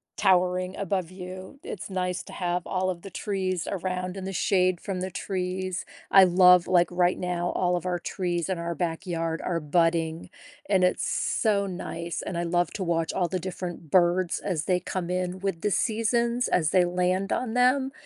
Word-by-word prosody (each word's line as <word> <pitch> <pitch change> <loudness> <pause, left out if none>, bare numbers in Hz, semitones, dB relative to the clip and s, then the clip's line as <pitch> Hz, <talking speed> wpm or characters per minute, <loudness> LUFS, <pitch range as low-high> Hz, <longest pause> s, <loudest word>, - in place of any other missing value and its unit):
towering 185 -1 +2
above 190 -3 -1
you. 185 +6 -9
It's 435 - -6
nice 180 -1 -2
to - - -12
have 175 -1 -2
all 185 0 0
of 175 -2 -7
the 195 - -9
trees 185 -2 -2
around 185 -1 -3
in 190 -1 -6
the 195 - -3
shade 185 -1 +2
from 190 -2 -4
the 185 - -2
trees. 185 0 -3 0.3
I 195 - +9
love 180 -1 +6
like, 175 -1 +4
right 180 0 +2
now, 175 -1 -2
all 180 -1 +1
of 175 +1 -3
our 180 -1 0
trees 175 -2 -2
in 185 -3 -2
our 170 0 -3
backyard 165 -1 -2
are 170 -2 -1
budding, 165 +1 0 0.4
and 190 -2 +3
it's 180 - +2
so 205 -3 +1
nice, 170 -2 -5
and 170 - -3
I 170 - 0
love 175 +1 +1
to 200 - -3
watch 165 -2 0
all 175 -2 0
the 185 - -2
different 175 -2 -6
birds 175 0 +3
as 170 -6 -2
they 180 -1 +2
come 180 0 -4
in 180 0 -2
with 195 -4 -2
the 210 - 0
seasons 235 +3 +1
as 160 -4 +2
they 180 0 +4
land 180 +2 0
on 245 -2 -2
them, 260 +2 +3
180 Hz, 190 wpm, -26 LUFS, 175-190 Hz, 0.4 s, I